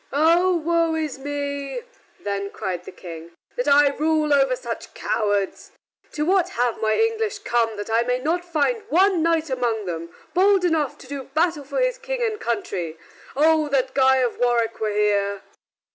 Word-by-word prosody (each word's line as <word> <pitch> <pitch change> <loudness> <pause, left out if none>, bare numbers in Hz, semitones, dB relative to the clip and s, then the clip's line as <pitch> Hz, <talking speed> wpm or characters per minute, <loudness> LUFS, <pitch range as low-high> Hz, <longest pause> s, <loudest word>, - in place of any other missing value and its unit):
"Oh, 340 +5 +4 0.4
we 320 -1 0
is 275 -3 -7
me!" 285 - -4 0.4
then 200 -1 -3
cried 180 -3 -5
the - - -8
King, 170 -1 -10 0.2
"that 245 - -2
I 285 0 +6
rule 310 -1 +1
over 270 -2 +3
such 235 -2 -7
cowards. 205 -3 -1 0.4
To 300 - -1
what 375 +1 +2
have 245 -1 0
my 220 0 +2
English 450 -2 0
come 235 - 0
that 205 - -5
I 225 +1 +3
may 250 +1 0
not 325 +7 -1
find 350 +7 0
one 375 0 +3
knight 325 -2 +1
among 235 -4 -1
them 170 -1 -5 0.2
bold 380 +1 +4
enough 315 -5 0
to - - -14
do 275 -1 -6
battle 315 +2 0
for 280 - -3
his - - +1
King - - -3
and 435 -2 -1
country? 185 -8 -3 0.4
Oh 310 +1 +3
that 265 -2 0
Guy 265 0 +4
of 250 -2 0
Warwick 235 -2 +1
were 220 - 0
here!" 205 -1 0
275 Hz, 175 wpm, -23 LUFS, 225-330 Hz, 0.4 s, I